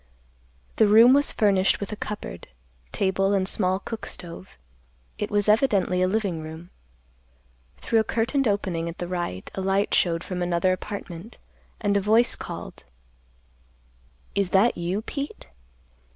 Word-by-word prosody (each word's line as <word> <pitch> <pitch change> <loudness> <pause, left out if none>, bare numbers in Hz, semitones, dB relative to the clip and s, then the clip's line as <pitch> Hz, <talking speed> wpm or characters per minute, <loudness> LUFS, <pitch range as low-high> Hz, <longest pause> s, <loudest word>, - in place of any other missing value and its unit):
The 220 - +5
room 225 +5 +7
was 285 +1 +3
furnished 195 -3 +2
with 200 - -5
a - - -3
cupboard, 210 0 -6 0.4
table 195 0 +1
and 190 -1 +1
small 185 -2 0
cook 220 +3 -7
stove. 175 +2 -8 0.6
It - - -2
was 205 0 +1
evidently 210 -5 +3
a 185 - +3
living 190 -5 -1
room. 160 +3 -9 1.1
Through 225 - +2
a - - +3
curtained 235 +5 0
opening 185 -5 -1
at 170 - -8
the 175 - -4
right, 175 - -4
a 190 - -4
light 195 +1 +1
showed 170 -1 +2
from 180 -1 -4
another 175 +1 +1
apartment, 195 +1 -7 0.4
and 205 -2 0
a 200 - +3
voice 220 +4 +4
called, - - -8 1.5
"Is 200 -2 0
that 200 +6 +4
you, 180 +5 -2
Pete?" 280 +4 -6
195 Hz, 145 wpm, -25 LUFS, 180-215 Hz, 1.5 s, room